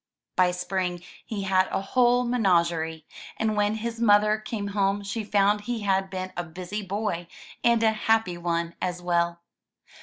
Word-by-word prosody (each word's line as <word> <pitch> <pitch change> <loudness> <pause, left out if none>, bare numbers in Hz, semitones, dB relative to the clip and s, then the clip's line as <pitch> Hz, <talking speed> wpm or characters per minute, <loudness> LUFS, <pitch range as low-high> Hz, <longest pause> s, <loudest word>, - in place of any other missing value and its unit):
By 185 -1 +4
spring 180 0 -2 0.2
he 205 -3 -4
had 190 -1 +3
a - - -1
whole 245 +5 +3
menagerie, 170 -9 +1 0.3
and 220 -1 0
when 210 +1 +1
his 230 +1 -4
mother 210 -1 +4
came 215 -1 -4
home 200 0 0
she 205 +3 -3
foimd 205 0 +2
he 235 +1 -3
had 195 -1 +1
been 185 -1 -5
a 175 - -2
busy 180 +5 -6
boy, 195 -3 -3 0.4
and 235 -1 +4
a 220 - +5
happy 220 -4 +1
one 170 -1 -1
as 180 -1 -2
well. 170 -1 0
195 Hz, 160 wpm, -26 LUFS, 180-215 Hz, 0.4 s, a